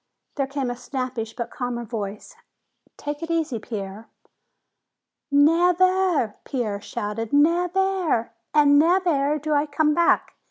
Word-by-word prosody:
There 275 -2 -1
came 275 -3 -2
a - - -4
snappish 250 -3 -5
but 235 -1 -5
calmer 245 -1 -4
voice. 215 - -6 0.6
"Take 290 +1 -5
it 330 - -5
easy, 320 -8 -1
Pierre." 205 0 -7 1.2
"Nev 330 +5 +4
air!" 370 - +2
Pierre 215 -6 -3
shouted. 210 +2 -4
"Nev 340 +5 +3
air, 375 -13 0 0.2
and 290 -1 +5
nev 360 +4 +3
air 295 -3 +1
do 305 +1 -2
I 290 +1 +2
come 300 +1 +1
back!" 340 +2 +2
285 Hz, 135 wpm, -23 LUFS, 235-330 Hz, 1.2 s, and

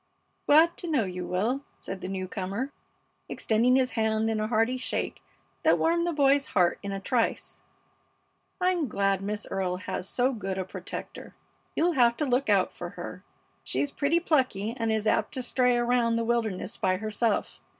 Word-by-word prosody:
"Glad 320 +3 +6
to 350 - -6
know 295 -8 +2
you, 180 -2 -5
Will," 230 +10 0
said 190 - -7
the - - -4
new 190 -1 -3
comer, 200 +8 -3 0.6
extending 235 +3 +2
his 255 -2 +2
hand 220 0 +1
in 220 - -1
a 215 - 0
hearty 225 +2 +2
shake 255 - -3 0.4
that - - +4
warmed 340 +1 +2
the - - +1
boy's 280 -2 +3
heart 175 -2 +3
in 200 - -5
a 195 - -3
trice. 230 +4 -1 1.0
"I'm 360 -4 +1
glad 195 -3 +1
Miss 205 +1 -3
Earle 185 -2 -1
has 185 0 -4
so 255 +2 +1
good 195 -4 -4
a 190 - -2
protector. - - -8 0.4
You'll 345 +2 +3
have 240 -6 +3
to 300 - 0
look 265 +2 +1
out - - +3
for - - -6
her. - - -7 0.4
She's 285 - -1
pretty 300 +4 +1
plucky 255 - +1
and 230 -3 -1
is 220 -1 0
apt 215 - +1
to 255 - -2
stray 250 -1 +2
around 240 -1 +2
the 230 0 0
wilderness 220 -5 -1
by 185 -1 +1
herself. 215 +1 -1
230 Hz, 180 wpm, -28 LUFS, 200-265 Hz, 1.0 s, Glad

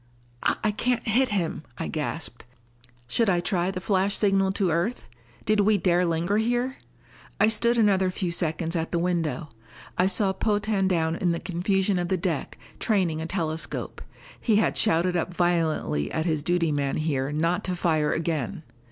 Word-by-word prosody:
"I 215 - +2
can't 235 +2 -1
hit 250 +4 +3
him," 180 -7 -1 0.2
I 165 - -3
gasped. 150 -4 -4 0.6
Should 225 - +2
I 175 -2 +3
try 175 0 0
the 190 -1 -3
flash 195 +1 +1
signal 195 -2 +2
to 190 -3 +1
Earth? 175 +10 -1 0.4
Did 215 0 +2
we 205 +1 +4
dare 180 -2 +2
linger 170 +5 0
here? 245 +4 0 0.6
I 210 +2 +5
stood 235 +2 +2
another 195 -4 +3
few 180 -1 -3
seconds 165 0 +1
at 165 -1 -2
the 175 - 0
window. 170 -2 -1 0.5
I 180 - +4
saw 195 0 +2
Potan 205 -2 0
down 165 -3 +1
in 175 -2 +1
the 170 - -2
confusion 190 +1 0
of 175 - -1
the 190 - 0
deck, 170 -5 -3 0.2
training 180 -7 +1
a 160 - -4
telescope. 165 -3 -3 0.4
He 225 - +2
had 215 - +2
shouted 180 -2 +2
up 175 +1 -2
violently 160 - 0
at 160 - -1
his 155 -4 0
duty 170 0 +1
man 140 -2 -1
here 145 -3 -1
not 165 +4 0
to 185 - -1
fire 160 -3 +1
again. 165 +1 -2
180 Hz, 170 wpm, -26 LUFS, 165-200 Hz, 0.6 s, I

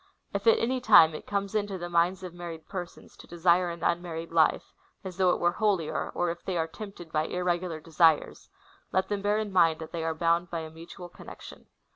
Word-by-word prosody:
" - - -41
If 200 +2 -3
at 225 - +7
any 255 +2 -1
time 205 -9 +7
it 155 - -9
comes 200 0 -2
into 205 -2 -1
the 175 -1 -5
minds 175 +2 +1
of 180 -2 -7
married 170 -2 -8
persons 180 -3 -8
to - - -14
desire 175 +1 +2
an 170 -1 -7
unmarried 170 -1 -2
life, 160 -2 +2 0.3
as 185 -2 -8
though 185 -1 +3
it - - +1
were 175 - +2
holier, 195 -6 -1
or 175 -1 0
if 170 - -9
they 185 -2 -2
are 160 - +1
tempted 175 -1 -10
by 155 0 0
irregular 180 -2 -2
desires,^ 160 -1 +1 0.4
let 190 0 0
them 205 -1 -2
bear 205 +1 +1
in 215 -2 -3
mind 165 -3 +4
that 160 -1 -9
they 170 -2 -4
are 160 0 -2
bound 170 +1 +1
by 170 -1 -3
a 160 0 -8
mutual 170 +3 -11
con 175 - -15
nection.'" - - -11
175 Hz, 225 wpm, -28 LUFS, 165-190 Hz, 0.4 s, at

